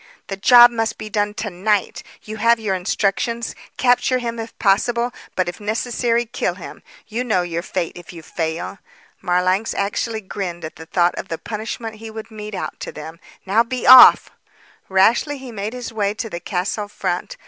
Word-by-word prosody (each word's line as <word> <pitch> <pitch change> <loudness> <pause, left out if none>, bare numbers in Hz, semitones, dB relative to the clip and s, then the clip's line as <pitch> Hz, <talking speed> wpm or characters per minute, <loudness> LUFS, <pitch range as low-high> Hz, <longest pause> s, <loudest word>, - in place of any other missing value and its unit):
"The 195 - -3
job 240 +4 +7
must 225 -1 -2
be 215 - -8
done 205 0 -1
to 210 -2 -4
night. 200 +3 0 0.2
You 215 0 -7
have 230 +2 +3
your 210 -3 -1
instructions. 200 +5 -1 0.2
Capture 250 0 +3
him 235 -2 -4
if 225 0 -8
possible; 235 +4 +1 0.2
but 185 -1 0
if 175 - -5
necessary, 230 +2 -1
kill 230 - -2
him. - - -10 0.2
You 230 +3 -3
know 215 -7 +1
your 170 -1 -3
fate, 175 -1 -3
if 175 -1 -11
you 165 -2 -11
fail." 165 +4 -4 0.4
Marlanx 185 +3 +1
actually 220 +3 -2
grinned 185 -4 -5
at 155 - -8
the 160 - -11
thought 175 0 +2
of - - -6
the 165 - -4
punishment 225 +2 -6
he 225 +1 -9
would 220 +1 -9
mete 210 -1 -7
out 185 - -5
to - - -6
them. 160 +2 -9 0.3
"Now 200 +4 +3
be 245 +1 -3
off!" 255 0 +9 0.6
Rashly 225 +10 +3
he 260 -2 -9
made 210 +1 -5
his 245 -2 -7
way 205 -1 -1
to 225 -1 -5
the 170 - -4
castle 190 +3 -3
front. 180 -3 -4
210 Hz, 185 wpm, -20 LUFS, 185-230 Hz, 0.6 s, off